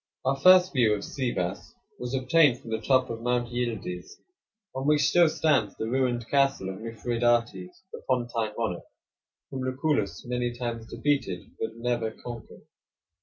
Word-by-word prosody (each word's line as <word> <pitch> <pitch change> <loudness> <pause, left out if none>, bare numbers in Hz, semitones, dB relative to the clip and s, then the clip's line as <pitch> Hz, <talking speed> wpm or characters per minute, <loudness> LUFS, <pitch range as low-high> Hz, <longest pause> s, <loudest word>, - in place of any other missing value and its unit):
Our 135 +1 +2
first 185 +4 +6
view 115 -6 +3
of 100 - -6
Sivas 100 -9 -3 0.2
was 125 +2 -3
obtained 130 0 +4
from 115 -4 -10
the 110 0 -2
top 130 +1 +2
of 115 0 -6
Mount 120 0 0
Yildiz, 110 -7 -4 0.6
on 135 +1 -3
which 150 -1 +4
still 170 +4 +5
stands 140 -10 +1
the 110 - -3
ruined 125 -3 0
castle 135 -8 +1
of 95 +2 -7
Mithridates, 115 - -1
the - - -8
Pontine 120 -4 -1
monarch, 110 -7 -2 0.7
whom 130 - -4
Lucullus 135 +4 -1
many 120 0 -2
times 115 -2 -4
defeated, 140 -12 -2
but 110 - -3
never 120 -1 -1
conquered. 115 +1 -10
120 Hz, 150 wpm, -27 LUFS, 115-130 Hz, 0.7 s, first